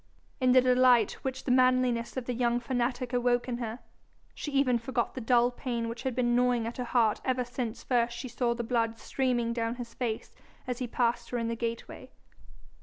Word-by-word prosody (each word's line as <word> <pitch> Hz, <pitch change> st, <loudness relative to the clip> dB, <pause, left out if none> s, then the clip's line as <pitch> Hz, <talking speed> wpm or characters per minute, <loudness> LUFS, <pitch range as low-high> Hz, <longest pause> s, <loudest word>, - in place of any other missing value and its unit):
In 255 Hz, -2 st, +3 dB
the 255 Hz, 0 st, +7 dB
delight 250 Hz, -3 st, +5 dB
which 265 Hz, 0 st, -4 dB
the 255 Hz, -, -1 dB
manliness 255 Hz, -1 st, +2 dB
of 255 Hz, -, -3 dB
the 250 Hz, -, -2 dB
young 240 Hz, 0 st, +1 dB
fanatic 245 Hz, 0 st, -2 dB
awoke 245 Hz, 0 st, +1 dB
in 240 Hz, -1 st, -3 dB
her, 230 Hz, -1 st, -4 dB, 0.6 s
she 295 Hz, -, -5 dB
even 265 Hz, -4 st, +2 dB
forgot 240 Hz, 0 st, -2 dB
the 260 Hz, -, -5 dB
dull 240 Hz, +1 st, +3 dB
pain 240 Hz, -2 st, -3 dB
which 230 Hz, 0 st, -6 dB
had 260 Hz, -3 st, -2 dB
been 240 Hz, -1 st, +2 dB
gnawing 245 Hz, -2 st, +2 dB
at 230 Hz, -, -5 dB
her 250 Hz, -, -2 dB
heart 230 Hz, -3 st, +2 dB
ever 255 Hz, -1 st, 0 dB
since 245 Hz, -2 st, -5 dB
first 240 Hz, -1 st, +1 dB
she 255 Hz, -, -5 dB
saw 240 Hz, 0 st, -1 dB
the 235 Hz, -, -3 dB
blood 230 Hz, -1 st, 0 dB
streaming 240 Hz, -2 st, -1 dB
down 230 Hz, 0 st, -1 dB
his 240 Hz, -2 st, -8 dB
face 230 Hz, -3 st, -3 dB, 0.3 s
as 250 Hz, -1 st, -3 dB
he 250 Hz, -, -2 dB
passed 235 Hz, 0 st, 0 dB
her 245 Hz, -, -2 dB
in 230 Hz, -1 st, -1 dB
the 230 Hz, -, -2 dB
gateway. 230 Hz, 0 st, -5 dB
245 Hz, 205 wpm, -29 LUFS, 235-255 Hz, 0.6 s, the